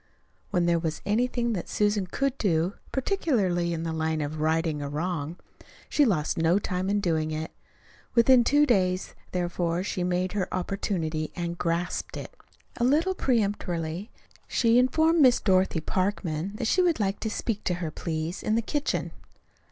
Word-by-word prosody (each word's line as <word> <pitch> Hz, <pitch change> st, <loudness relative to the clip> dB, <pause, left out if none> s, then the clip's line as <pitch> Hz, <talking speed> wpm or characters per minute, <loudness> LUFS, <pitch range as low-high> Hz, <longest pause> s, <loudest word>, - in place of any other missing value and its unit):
When 180 Hz, -4 st, +1 dB
there 170 Hz, -1 st, +3 dB
was 160 Hz, -1 st, -3 dB
anything 235 Hz, +2 st, +1 dB
that 180 Hz, -, -4 dB
Susan 205 Hz, -2 st, +1 dB
could 275 Hz, +7 st, -1 dB
do 175 Hz, -2 st, +1 dB, 0.2 s
particularly 220 Hz, -, 0 dB
in 165 Hz, -1 st, -2 dB
the 165 Hz, -1 st, -2 dB
line 160 Hz, 0 st, -1 dB
of 150 Hz, +1 st, -3 dB
righting 160 Hz, -1 st, +1 dB
a 140 Hz, -, -4 dB
wrong 160 Hz, +1 st, -3 dB, 0.5 s
she 295 Hz, -, +4 dB
lost 165 Hz, -, 0 dB
no 165 Hz, +3 st, +3 dB
time 185 Hz, -1 st, -2 dB
in 205 Hz, +1 st, +2 dB
doing 160 Hz, -5 st, 0 dB
it. 155 Hz, +1 st, -4 dB, 0.6 s
Within 245 Hz, +1 st, +6 dB
two 290 Hz, +4 st, +4 dB
days, 185 Hz, -7 st, +1 dB, 0.2 s
therefore, 175 Hz, -1 st, -1 dB
she 185 Hz, -2 st, -2 dB
made 180 Hz, +1 st, 0 dB
her 195 Hz, -3 st, -2 dB
opportunity, 170 Hz, -5 st, -2 dB
and 170 Hz, -1 st, -3 dB
grasped 170 Hz, +1 st, -2 dB
it. -, -, -8 dB, 0.4 s
A 240 Hz, -, -1 dB
little 310 Hz, +9 st, +3 dB
peremptorily 200 Hz, -, -1 dB, 0.4 s
she 230 Hz, +1 st, +3 dB
informed 315 Hz, +6 st, +3 dB
Miss 255 Hz, -3 st, +6 dB
Dorothy 185 Hz, -4 st, +2 dB
Parkman 185 Hz, -1 st, -1 dB
that 230 Hz, -, -3 dB
she 365 Hz, +11 st, +3 dB
would 345 Hz, -6 st, +2 dB
like 195 Hz, -1 st, 0 dB
to 220 Hz, -, -2 dB
speak 215 Hz, 0 st, -3 dB
to 180 Hz, -, +1 dB
her, 170 Hz, -3 st, -4 dB
please, 160 Hz, +2 st, -4 dB
in 215 Hz, -, 0 dB
the 230 Hz, -, +1 dB
kitchen. 295 Hz, +6 st, -1 dB
185 Hz, 165 wpm, -27 LUFS, 165-230 Hz, 0.6 s, Within